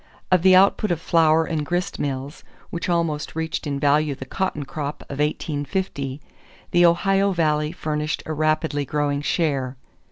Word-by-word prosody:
Of 185 -2 +5
the 185 +1 +6
output 200 +2 +4
of 170 - 0
flour 160 -1 +3
and 160 -3 -2
grist 175 +4 -2
mills, 140 +1 -4 0.3
which 170 +1 -3
almost 165 -4 -1
reached 160 -1 -3
in 140 -1 -2
value 145 0 +2
the 135 - -8
cotton 155 -1 -2
crop 145 0 -5
of 140 - -6
1850, 150 -1 -2 0.5
the 175 0 +5
Ohio 195 +3 +2
Valley 150 -3 +1
furnished 155 -2 -3
a 155 - -3
rapidly 155 -1 0
growing 145 0 -1
share. 140 -4 -1
155 Hz, 155 wpm, -23 LUFS, 145-170 Hz, 0.5 s, the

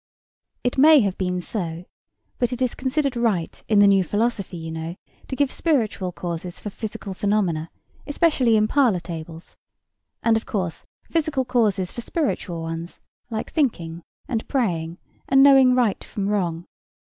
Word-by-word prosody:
It 245 +1 0
may 305 0 +8
have 195 -3 0
been 180 -1 -2
so; 175 -3 -4 0.5
but 245 0 +1
it 250 - -4
is 255 -2 +1
considered 275 0 -1
right 220 -9 -1
in 215 - +3
the 205 - +7
new 195 -1 +5
philosophy, 205 0 -1
you 160 0 -6
know, 160 +1 -5 0.3
to 265 - -4
give 285 0 +1
spiritual 220 - 0
causes 175 0 -5
for 210 - -6
physical 215 -2 -6
phenomena—especially 215 - 0
in 215 0 +3
parlour 245 -8 +3
tables; 165 -1 -8 0.7
and, 230 -1 +4
of 220 - -6
course, 185 -6 -3 0.2
physical 305 -5 -1
causes 210 -7 +1
for 240 - -6
spiritual 215 - -2
ones, 165 +1 -6 0.3
like 220 -2 -4
thinking, 175 - -1 0.3
and 230 -4 -2
praying, 175 - -1 0.3
and 270 0 +6
knowing 270 -2 +7
right 240 -5 +1
from 200 -1 -3
wrong. 175 -5 -1
210 Hz, 150 wpm, -23 LUFS, 175-255 Hz, 0.7 s, may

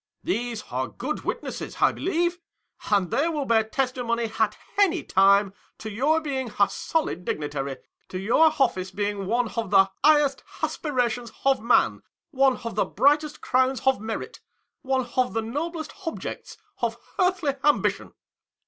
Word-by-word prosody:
These 240 -8 -2
are 130 +1 -1
good 295 +5 -5
witnesses, - - -4
I - - +5
believe, 345 -1 -1 0.5
and 195 -5 +2
they 315 +4 +2
will 300 -4 -2
bear 225 -2 +3
testimony 235 -1 -1
at - - +2 0.2
any 370 -4 +3
time 195 0 +4 0.2
to 220 - -7
your 285 +9 +2
being 265 -6 -3
a 200 - +6
solid 320 - -2
dignitary, 145 -4 -3 0.3
to 185 - -5
your 230 +12 +4
office 190 -8 +1
being 200 0 -3
one 235 +2 +1
of 230 -4 -3
the 195 -1 +5
highest 295 -2 +4 0.2
aspi 310 - -2
rations 245 -3 0
of 270 -3 +3
man, 235 +2 +3 0.3
one 270 -3 +3
of 230 - -4
the - - +1
brightest 295 +2 +2
crowns 260 -1 +1
of 265 -5 +3
merit, 220 0 -5 0.4
one 260 -1 0
of 255 -1 +2
the 225 - 0
noblest 315 +7 -4
objects 325 - -6 0.2
of 230 -1 -1 0.2
earthly 360 -6 +2
ambition. 295 0 +1
245 Hz, 150 wpm, -25 LUFS, 215-295 Hz, 0.5 s, a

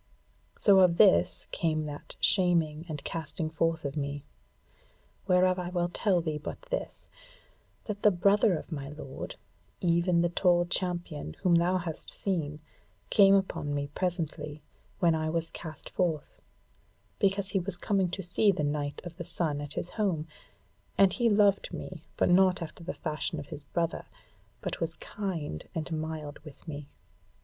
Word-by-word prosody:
So 195 -2 +6
of 180 -2 +5
this 85 +1 +5
came 155 -2 0
that 145 -1 -8
shaming 170 -4 +3
and 150 -2 -5
casting 160 0 -2
forth 165 0 0
of 140 +1 -3
me. 140 -1 -3 1.0
Whereof 185 0 +4
I 175 -1 -3
will 175 -1 0
tell 180 0 +1
thee 155 -2 -2
but - - -6
this, - - -4 0.8
that 205 -2 -5
the 210 - +7
brother 200 0 +3
of - - -9
my 140 -3 -4
lord, 150 -3 -7 0.4
even 170 0 +3
the 175 - +2
tall 175 0 +3
champion 175 - -3
whom 180 - +4
thou 175 +2 +4
hast 170 -3 -3
seen, 155 -6 -2 0.5
came 195 -1 +7
upon 170 -7 0
me 145 0 -2
presently, 155 -4 -3 0.3
when 170 -2 +4
I 155 0 0
was 165 0 -1
cast 160 -2 -8
forth; 165 -5 -2 0.8
because 195 0 +1
he 195 - +1
was 180 0 -4
coming 190 -1 +1
to 195 +2 -4
see 200 +4 +3
the 165 -5 -2
Knight 145 0 -2
of 170 -1 -8
the 175 - -4
Sun 165 -4 -1
at 145 0 -6
his 175 - -3
home; 180 -8 -1 0.7
and 195 -1 +6
he 240 -2 +2
loved 205 -2 +3
me, 180 -4 -7 0.2
but - - +3
not 185 +1 +5
after 170 +1 -7
the 165 - -4
fashion 155 +1 -3
of 145 - -9
his 145 - -7
brother, 170 +1 -2 0.5
but - - -4
was 165 -1 -1
kind 165 - -5
and 160 +1 -3
mild 155 -2 -4
with 150 +1 -14
me. 145 -2 -6
170 Hz, 160 wpm, -29 LUFS, 155-185 Hz, 1.0 s, the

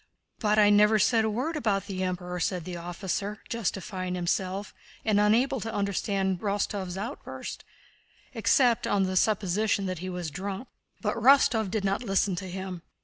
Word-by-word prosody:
"But 210 -1 +2
I 205 -1 +6
never 210 +1 +5
said 220 +1 +3
a - - +1
word 260 +10 -2
about 200 -9 0
the 190 -2 -4
Emperor!" 180 -1 -3
said 175 -1 -1
the 180 -1 -5
officer, 185 +4 -3
justifying 185 -4 -3
himself, 185 +3 -2 0.3
and 215 -2 +3
unable 240 +6 +3
to 225 +1 -4
understand 195 -2 -1
Rostóv's 200 -2 -2
outburst, 230 +8 -6 0.7
except 245 -5 +3
on 200 -1 +2
the 185 0 -1
supposition 200 0 +1
that 185 -3 -3
he 185 +2 -5
was 180 -3 -4
drunk. 195 - -5 0.3
But 210 0 -1
Rostóv 230 -3 +5
did 200 0 -1
not 195 +3 0
listen 195 -4 +1
to 190 0 -5
him. 185 -1 -5
200 Hz, 160 wpm, -28 LUFS, 185-215 Hz, 0.7 s, I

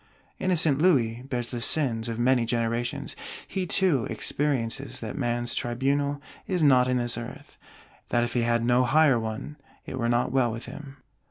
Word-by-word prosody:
Innocent 160 -6 +3
Louis 125 -9 +2
bears 120 -3 -2
the 120 -2 -4
sins 120 -4 +1
of 115 - -4
many 125 0 +3
generations: 115 +1 -2 0.3
he 185 -2 -3
too 165 - +2
experiences 135 +2 -1
that 110 -2 -6
man's 120 -3 -1
tribunal 140 +4 -1 0.3
is 180 -4 0
not 130 -3 +5
in 125 0 +1
this 120 -1 -1
Earth; 115 - -10 0.5
that 120 - +2
if 120 - -3
he 120 - +1
had 115 0 +1
no 125 +1 +3
Higher 135 0 +4
one, 110 +6 -5 0.3
it 130 - -6
were 115 -1 0
not 120 +1 +1
well 130 -3 +2
with 115 +1 -6
him. 135 +2 -10
125 Hz, 170 wpm, -26 LUFS, 120-140 Hz, 0.5 s, not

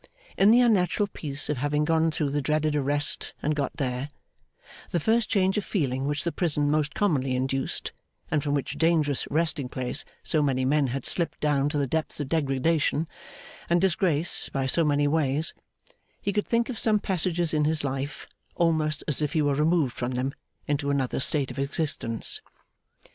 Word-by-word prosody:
In 195 - +5
the 240 +3 +6
unnatural 205 -4 +3
peace 145 -7 -2
of 150 - -1
having 145 +3 0
gone 160 +1 +2
through 150 -2 -1
the 145 +1 0
dreaded 155 +1 0
arrest, 145 0 -1
and 150 - +1
got 140 -3 -2
there, 130 +1 -2 0.8
the 175 - 0
first 220 +6 +1
change 195 0 +2
of - - -5
feeling 135 - -1
which 145 +1 -1
the 170 - -1
prison 150 -5 0
most 150 -1 0
commonly 140 -11 +1
induced, 135 +1 -1 0.4
and 150 - +2
from 145 0 -1
which 140 - -3
dangerous 160 -4 +2
resting 155 -3 0
place 125 -1 -2 0.2
so 155 - +1
many 130 -3 +1
men 145 +1 +2
had 130 +1 -4
slipped 170 -2 0
down 145 -1 +1
to 150 - -2
the 140 - +1
depths 160 +4 -2
of 145 -3 -3
degradation 155 +1 +1 0.6
and 175 +1 +4
disgrace 175 -3 +1
by 135 -2 -2
so 165 +5 +4
many 145 -1 +2
ways, 150 0 0 0.7
he 200 - -2
could 210 - -1
think 235 0 +1
of 245 -4 -4
some 215 -2 +3
passages 175 -4 0
in 150 -1 +2
his 155 -1 +1
life, 135 +1 -4 0.3
almost 155 -3 +1
as 150 0 +4
if 150 - -1
he 160 - +2
were 145 -1 +2
removed 150 -2 +1
from 125 +1 -3
them 130 +2 -2 0.3
into 145 -1 -1
another 135 -3 0
state 135 -1 +1
of 125 - -7
existence. 140 -5 -1
150 Hz, 180 wpm, -26 LUFS, 140-165 Hz, 0.8 s, the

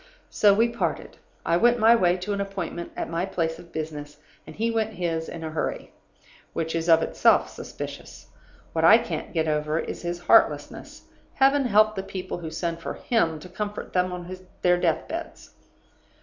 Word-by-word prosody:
"So 205 - +5
we 225 +4 +4
parted. 235 0 -3 0.3
I 170 - +3
went 240 +5 +4
my 225 +1 +6
way 180 -4 +3
to 185 +3 -3
an 200 - -2
appointment 185 -3 -5
at - - -2
my 165 +1 -2
place 165 -4 -2
of 170 - -14
business, 150 -2 -6 0.3
and - - -10
he 230 +2 0
went 220 -1 -1
his 165 -4 -2
in 165 - -7
a 160 - -4
hurry; 155 - -3 0.6
which 160 0 -2
is 165 +1 -1
of 165 0 +6
itself - - +3
suspicious. - - -8 0.5
What 160 - 0
I 205 +7 +9
can't 235 -1 -5
get 160 -2 0
over 150 0 0
is - - -4
his 175 0 -4
heartlessness. - - +2 0.3
Heaven 275 +1 +4
help 215 -1 +4
the 195 - -3
people 190 -2 -6
who 165 -2 -6
send 165 +1 -3
for 165 - -5
him 165 -10 0
to 180 - -10
comfort 205 +3 -6
them 180 0 +1
on 180 +1 -6 0.3
their 180 0 +4
death 165 -3 0
beds! 335 0 -7
180 Hz, 185 wpm, -25 LUFS, 165-215 Hz, 0.6 s, I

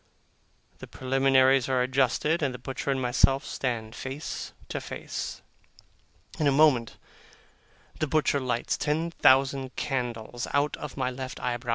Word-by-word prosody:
The - - -9
preliminaries 135 0 +3
are 130 -1 +2
adjusted, 135 +5 +1
and 135 -4 0
the - - -6
butcher 130 +3 -5
and 135 -1 +1
myself 130 +2 +2
stand 115 -4 -3
face 135 +5 -6 0.2
to - - -3
face. - - -6 1.0
In 150 - +2
a - - +5
moment 135 -5 +3 1.0
the 155 - 0
butcher 145 -1 +2
lights 125 -3 -1
ten 160 +3 -1
thousand 135 -2 +3
candles 120 -3 -3
out 145 +1 +2
of - - -8
my 130 -1 0
left 130 0 -6
eyebrow. 120 0 -3
130 Hz, 140 wpm, -27 LUFS, 125-140 Hz, 1.0 s, a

